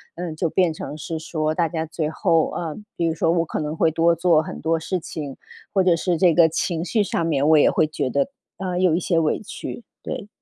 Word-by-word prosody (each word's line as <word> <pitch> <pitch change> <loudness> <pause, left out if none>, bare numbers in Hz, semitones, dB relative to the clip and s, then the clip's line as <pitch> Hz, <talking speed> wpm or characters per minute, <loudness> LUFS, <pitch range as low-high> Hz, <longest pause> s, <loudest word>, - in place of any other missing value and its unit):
嗯， 170 -2 -5
就 165 +1 -1
变 175 -2 +2
成 150 - -7
是 160 +1 -5
说 155 -1 -2
大 165 0 +1
家 160 -1 -2
最 160 -1 -3
后， 165 -1 +2
呃， 160 -3 -3 0.2
比 170 - -1
如 165 - +1
说 165 - 0
我 170 -1 +1
可 - - -4
能 150 0 -3
会 160 - +3
多 165 +2 +3
做 170 -1 +4
很 - - -7
多 165 +1 0
事 180 +3 -2
情， 150 -4 -7 0.3
或 195 -2 +3
者 180 -2 +4
是 170 0 0
这 175 -1 +4
个 165 0 +6
情 165 +1 -1
绪 210 +4 +1
上 170 -4 -1
面， 145 -3 +1
我 160 - +6
也 - - +5
会 - - +2
觉 150 -3 -2
得， 140 - 0 0.3
呃， 180 -2 -2
有 180 -3 +3
一 175 - +1
些 170 -1 +1
委 155 -2 +1
屈， 225 +2 -7 0.2
对。 205 - -5
165 Hz, 260 characters per minute, -22 LUFS, 155-175 Hz, 0.3 s, 个